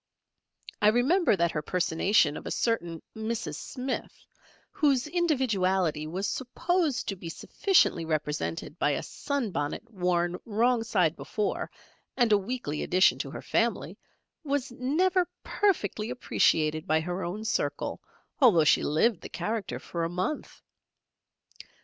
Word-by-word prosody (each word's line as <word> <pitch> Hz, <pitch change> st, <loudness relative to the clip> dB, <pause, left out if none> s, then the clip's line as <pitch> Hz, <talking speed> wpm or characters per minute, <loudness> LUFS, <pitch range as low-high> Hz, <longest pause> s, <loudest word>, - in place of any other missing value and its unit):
I 210 Hz, -, +5 dB
remember 255 Hz, -, +4 dB
that 170 Hz, -2 st, +1 dB
her 150 Hz, -, -2 dB
personation 170 Hz, -1 st, +2 dB
of -, -, -7 dB
a -, -, -2 dB
certain 175 Hz, -9 st, -1 dB
Mrs. 220 Hz, -9 st, -3 dB
Smith, 255 Hz, +1 st, -5 dB, 0.5 s
whose 275 Hz, -4 st, +2 dB
individuality 200 Hz, -, +1 dB
was 185 Hz, +5 st, -2 dB
supposed 320 Hz, +3 st, -1 dB
to 195 Hz, -, -2 dB
be 175 Hz, -2 st, -8 dB
sufficiently 340 Hz, -, +2 dB
represented 155 Hz, +1 st, -3 dB
by 145 Hz, -, +2 dB
a -, -, -2 dB
sun 280 Hz, -7 st, -3 dB
bonnet 145 Hz, +8 st, -3 dB
worn 180 Hz, -2 st, 0 dB
wrong 235 Hz, +2 st, +1 dB
side 180 Hz, -8 st, +1 dB
before 210 Hz, -1 st, -3 dB, 0.5 s
and 240 Hz, -4 st, +3 dB
a 210 Hz, -, +7 dB
weekly 195 Hz, -8 st, -4 dB
addition 185 Hz, +1 st, +3 dB
to -, -, -3 dB
her -, -, -8 dB
family, -, -, 0 dB, 0.5 s
was 280 Hz, -3 st, -1 dB
never 350 Hz, +9 st, +1 dB
perfectly 225 Hz, -, 0 dB
appreciated 155 Hz, -9 st, +1 dB
by 155 Hz, 0 st, +3 dB
her 180 Hz, +3 st, -3 dB
own 205 Hz, +6 st, -4 dB
circle 220 Hz, -, -2 dB, 0.4 s
although 215 Hz, -, +6 dB
she 150 Hz, -, +4 dB
lived 175 Hz, +5 st, +2 dB
the -, -, -8 dB
character 220 Hz, -1 st, -3 dB
for 170 Hz, -1 st, -4 dB
a 165 Hz, -, -1 dB
month. 185 Hz, -, -4 dB
210 Hz, 135 wpm, -28 LUFS, 170-255 Hz, 0.5 s, a